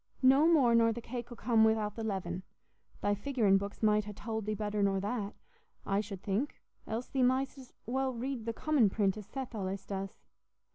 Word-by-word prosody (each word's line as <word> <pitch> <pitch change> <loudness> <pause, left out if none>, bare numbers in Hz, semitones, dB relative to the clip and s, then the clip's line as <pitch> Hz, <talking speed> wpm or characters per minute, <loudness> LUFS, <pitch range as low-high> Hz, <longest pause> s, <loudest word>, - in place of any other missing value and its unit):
No 270 +4 +6
more 280 -8 +5
nor 230 0 +5
the 230 - -4
cake 240 0 -6
'ull 240 - -8
come 225 -1 +3
wi'out 220 -2 +2
the 225 - -4
leaven. 190 -4 -2 0.6
Thy 205 - +2
figurin' 205 -3 +2
books 200 +2 -6
might 210 -1 +4
ha' 210 -1 -7
tould 220 -1 -4
thee 215 - 0
better 210 0 -2
nor 195 -1 +2
that, 205 0 -3 0.5
I 195 0 +1
should 200 -3 -8
think, 215 +8 -1 0.3
else 230 +3 -3
thee 265 - 0
mightst 260 +2 +2
as 255 - -13
well 265 +2 0
read 245 -1 -4
the - - +1
commin 280 -5 +3
print, 195 -1 +1
as 210 -2 -9
Seth 265 +2 -6
allays 195 -2 -4
does." 195 -1 -5
220 Hz, 200 wpm, -32 LUFS, 200-250 Hz, 0.6 s, No